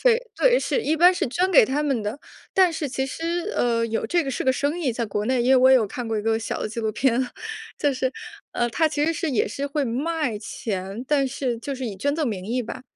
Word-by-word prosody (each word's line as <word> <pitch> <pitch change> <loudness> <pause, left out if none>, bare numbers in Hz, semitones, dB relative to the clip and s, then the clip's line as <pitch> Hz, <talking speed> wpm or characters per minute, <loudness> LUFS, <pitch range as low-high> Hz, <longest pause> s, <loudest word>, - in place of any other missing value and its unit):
非。 - - +4
对， - - +4
是 485 - 0
一 315 - +1
般 355 +3 +7
是 - - -1
捐 365 +8 +1
给 305 - +8
他 285 +3 0
们 275 -7 0
的。 225 +8 -4 0.3
但 370 -3 +5
是 305 -2 -3
其 265 +1 -2
实， 340 +7 -3
呃， 230 -1 +2
有 225 0 -2
这 345 -1 +2
个 270 - -2
是 - - -3
个 260 - +4
生 285 +6 -1
意 275 -8 0
在 235 0 -2
国 210 +1 -2
内， 255 -1 +2
因 250 - +2
为 265 - +7
我 260 +1 +6
有 245 -4 +5
看 240 +4 -5
过 225 - -1
一 - - -3
个 225 0 +1
小 225 - -4
的 - - -2
纪 230 - -7
录 220 -1 -1
片。 255 +1 +1 0.5
就 290 -2 +2
是， 260 0 -1 0.4
呃， 240 0 0
它 320 +5 +2
其 295 -1 0
实 330 - +2
是 335 0 -2
也 230 - +1
是 280 +5 -3
会 285 0 -1
卖 280 -1 -1
钱， 205 +1 -5
但 285 -2 +3
是 250 -2 -2
就 275 +4 -4
是 260 0 -5
以 205 - -5
捐 285 +9 0
赠 305 -6 0
名 190 -3 -5
义 245 +3 -1
吧。 230 - -7
260 Hz, 285 characters per minute, -24 LUFS, 230-310 Hz, 0.5 s, 给